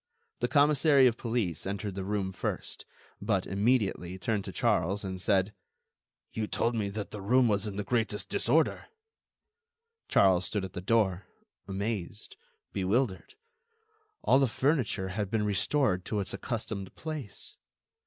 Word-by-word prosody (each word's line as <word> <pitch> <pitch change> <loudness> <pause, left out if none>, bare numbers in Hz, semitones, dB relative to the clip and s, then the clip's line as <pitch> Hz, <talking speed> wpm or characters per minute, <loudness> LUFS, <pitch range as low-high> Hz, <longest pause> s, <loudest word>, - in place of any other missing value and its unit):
The - - +1
commissary 145 -1 +5
of 120 -3 +4
police 115 - -2
entered 100 0 -3
the 95 0 -4
room 100 -1 -1
first, 95 - -4 0.3
but, 100 -2 0
immediately, 100 -4 0
turned 105 +1 -1
to - - -5
Charles 100 +5 +1
and 95 -1 -4
said: 95 +1 +2 0.8
"You 110 -1 -2
told 115 - 0
me 105 -3 -1
that 105 +1 -5
the 105 - -6
room 125 +5 +4
was 105 -1 +1
in 100 - -5
the 105 - -2
greatest 110 -1 -1
disorder." 155 +7 +1 1.2
Charles 95 -2 +4
stood 100 +2 -2
at 95 - -9
the 90 - -5
door, 95 -2 +1 0.4
amazed, 100 0 -4 0.4
bewildered; 100 - 0 0.9
all 135 - +5
the 135 - +4
furniture 125 -7 0
had 100 +1 -2
been 105 0 0
restored 100 0 +1
to 105 - -1
its 95 -1 -2
accustomed 105 -5 -4
place. 155 -10 -7
105 Hz, 145 wpm, -30 LUFS, 95-115 Hz, 1.2 s, commissary